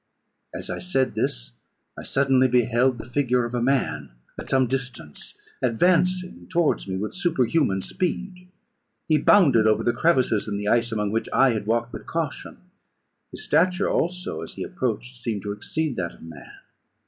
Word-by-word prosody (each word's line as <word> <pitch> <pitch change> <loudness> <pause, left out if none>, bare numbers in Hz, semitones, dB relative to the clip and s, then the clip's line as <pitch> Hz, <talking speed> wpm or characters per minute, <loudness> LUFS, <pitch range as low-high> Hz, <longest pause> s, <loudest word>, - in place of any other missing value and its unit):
As - - -6
I - - -4
said 135 -8 0
this, - - -2 0.4
I - - -8
suddenly 135 -1 +2
beheld 125 +1 +2
the 110 - -8
figure 125 -1 +1
of 120 - -6
a 120 - -1
man, 135 +1 0 0.3
at - - -8
some 130 -1 +3
distance, 125 - -5 0.3
advancing 180 - +1
towards 170 -10 +1
me 95 -1 -3
with 105 +3 -4
superhuman 155 - +1
speed. 180 - -4 0.6
He 155 -2 +3
bounded 135 - +5
over 110 - +2
the 120 - +2
crevices 125 -7 +2
in 100 -1 -2
the 105 0 -4
ice, 115 +1 +2
among 105 -2 -1
which 115 +1 -2
I 135 -1 +4
had 105 -2 -3
walked 115 +1 0
with - - -8
caution; 165 -4 -4 0.7
his - - -8
stature, 185 +2 +2
also, 175 - -1
as 80 - -6
he - - -4
approached, - - -3
seemed 105 - -3
to 105 - -3
exceed 145 +7 -3
that 85 -2 -3
of - - -17
man. 80 -3 -11
125 Hz, 170 wpm, -24 LUFS, 110-160 Hz, 0.7 s, bounded